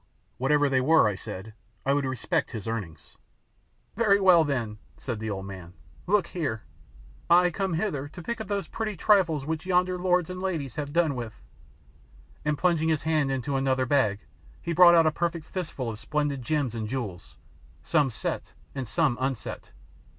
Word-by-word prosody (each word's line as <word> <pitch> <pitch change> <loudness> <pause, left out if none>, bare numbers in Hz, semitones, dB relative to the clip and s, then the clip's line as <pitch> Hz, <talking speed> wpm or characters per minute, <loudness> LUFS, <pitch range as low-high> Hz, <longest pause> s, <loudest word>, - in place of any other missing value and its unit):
Whatever 145 +3 +3
they 135 -2 +2
were, 155 -2 +5
I 105 - 0
said, 95 +2 -8 0.3
I 135 - +3
would 140 -1 +1
respect 130 -3 -1
his 110 -3 -6
earnings. 95 -10 -6 0.8
"Very 205 -3 +4
well, 185 -4 +6
then," 120 -8 -2 0.2
said 120 -5 -4
the 110 0 -4
old 95 -2 -4
man, 95 -3 -9 0.3
"look 200 -1 +3
here! 140 -11 -3 0.7
I 180 +1 +6
come 190 -1 -1
hither 160 -7 -2
to 170 +4 -10
pick 235 +4 -3
up 220 - -6
those 200 -1 -2
pretty 215 -3 -4
trifles 165 -8 +3
which 160 +3 -3
yonder 180 0 +2
lords 180 -1 +1
and 185 0 -6
ladies 160 -9 -2
have 145 -1 -4
done 165 -2 +2
with," 120 -4 -6 1.0
and 150 -1 0
plunging 165 -2 +2
his 155 -2 +1
hand 155 -3 +1
into 135 +1 -2
another 130 -1 +1
bag 115 -7 +2 0.4
he 170 - -3
brought 175 0 +8
out 165 -1 +6
a 155 - +4
perfect 165 0 -2
fistful 155 -11 -4
of 105 - -8
splendid 145 -2 -1
gems 140 -2 -1
and 110 -2 -3
jewels, 110 -8 -5 0.5
some 150 -4 +2
set 110 - -4 0.2
and 130 -3 -4
some 130 +1 +1
unset. 130 -4 -3
145 Hz, 175 wpm, -27 LUFS, 125-175 Hz, 1.0 s, brought